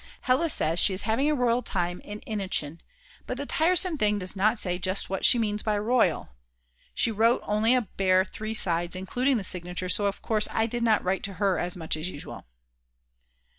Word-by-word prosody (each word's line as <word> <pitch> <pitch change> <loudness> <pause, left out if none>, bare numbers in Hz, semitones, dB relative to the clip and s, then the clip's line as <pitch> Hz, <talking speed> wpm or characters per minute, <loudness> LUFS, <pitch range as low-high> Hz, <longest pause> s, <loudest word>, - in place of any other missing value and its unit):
Hella 270 +6 +1
says 165 - +3
she 190 - +3
is 190 - 0
having 235 +7 0
a 305 - +1
royal 245 -2 +1
time 175 -5 -2
in 210 0 -9
Innichen; 185 -7 -3 0.5
but 250 - -4
the 285 - -5
tiresome 340 +1 +3
thing 210 0 +2
does 185 0 -1
not 215 +4 +1
say 180 -3 -1
just 185 +1 -1
what 195 - -3
she - - +5
means 210 -2 -1
by 210 -1 -1
royal; 210 - 0 0.7
she 230 - +1
wrote 225 +3 +2
only 220 +4 +2
a 250 - +2
bare 185 -1 +1
3 215 +3 -7
sides 175 -3 +1
including 245 +8 -1
the 210 - -4
signature 180 0 -1
so 205 +2 +1
of 195 - -5
course 215 -2 +1
I 220 - 0
did 235 +1 -3
not 220 -3 +2
write 190 +1 -1
to 200 - -6
her 190 -2 0
as 175 0 -3
much 160 -3 -3
as 155 +3 -3
usual. 145 - -10
205 Hz, 205 wpm, -26 LUFS, 185-230 Hz, 0.7 s, she